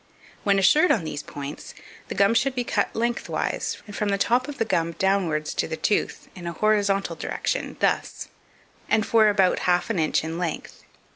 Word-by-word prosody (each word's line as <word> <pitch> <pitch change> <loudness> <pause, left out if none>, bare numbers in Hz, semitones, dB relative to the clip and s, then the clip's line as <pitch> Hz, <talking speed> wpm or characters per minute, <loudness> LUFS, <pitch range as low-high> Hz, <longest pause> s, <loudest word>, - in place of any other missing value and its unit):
When 200 -1 +3
assured 295 - +5
on 200 - +2
these 155 -2 -4
points, 145 -1 -8 0.3
the - - -5
gum 200 +2 +4
should 265 +3 +1
be 250 - 0
cut - - -1
lengthwise, 235 +1 -2
and 205 -2 -10
from 210 0 -1
the 200 - +1
top 245 +6 +1
of 290 -1 -7
the 225 - 0
gum 170 -5 0
downwards 175 -5 0
to - - -1
the 160 - -4
tooth, 205 +6 -1
in 175 -2 -8
an 170 - -3
horizontal 205 0 +1
direction, - - -3
thus, - - 0 0.6
and 220 0 +2
for 220 -2 +4
about 195 -3 +3
half 180 +5 +2
an 195 - -1
inch 155 0 +1
in 165 +2 -4
length. 170 -4 -5
200 Hz, 190 wpm, -24 LUFS, 170-220 Hz, 0.6 s, assured